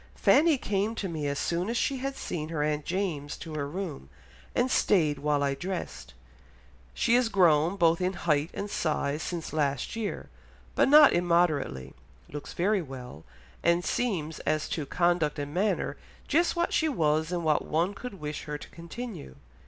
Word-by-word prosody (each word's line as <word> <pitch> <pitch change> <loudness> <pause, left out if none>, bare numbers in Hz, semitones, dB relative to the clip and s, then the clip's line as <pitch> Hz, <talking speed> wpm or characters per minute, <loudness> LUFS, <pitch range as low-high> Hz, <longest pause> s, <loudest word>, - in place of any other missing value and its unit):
Fanny 315 -1 +4
came 210 -1 -1
to 200 - -3
me 155 -4 -3
as 140 0 -2
soon 175 +6 -1
as 235 - -1
she 275 +2 0
had 270 +1 -3
seen 155 - -4
her 155 -3 -1
aunt 150 0 -1
James 170 -6 -2
to 160 - -8
her 145 -2 -2
room, 155 - -6 0.5
and 255 +1 +2
stayed 155 -8 +3
while 145 0 +1
I 140 -1 +1
dressed... 65 - -6 0.8
she 230 - +2
is 245 -1 +4
grown 175 -3 +4
both 170 -2 +3
in 180 +1 0
height 155 -3 0
and 200 - -3
size 155 -5 -1
since 170 -1 -4
last 145 - -1
year, 225 -2 -4 0.5
but - - +3
not 300 +1 +8
immoderately, 160 - +1 0.4
looks 145 0 -7
very 200 +3 +1
well, 125 - -9 0.4
and 170 +1 +2
seems 175 -11 -1
as 155 0 -1
to 150 -4 -3
conduct 175 -3 +1
and 145 0 -4
manner 200 +5 0 0.3
just 340 +5 +2
what 345 0 0
she 315 - +2
was 160 - +1
and 175 -1 -2
what 155 -2 +2
one 170 +5 0
could 245 +1 -7
wish 150 -4 -6
her 150 0 -4
to - - -12
continue." 170 - -8
170 Hz, 175 wpm, -28 LUFS, 150-200 Hz, 0.8 s, not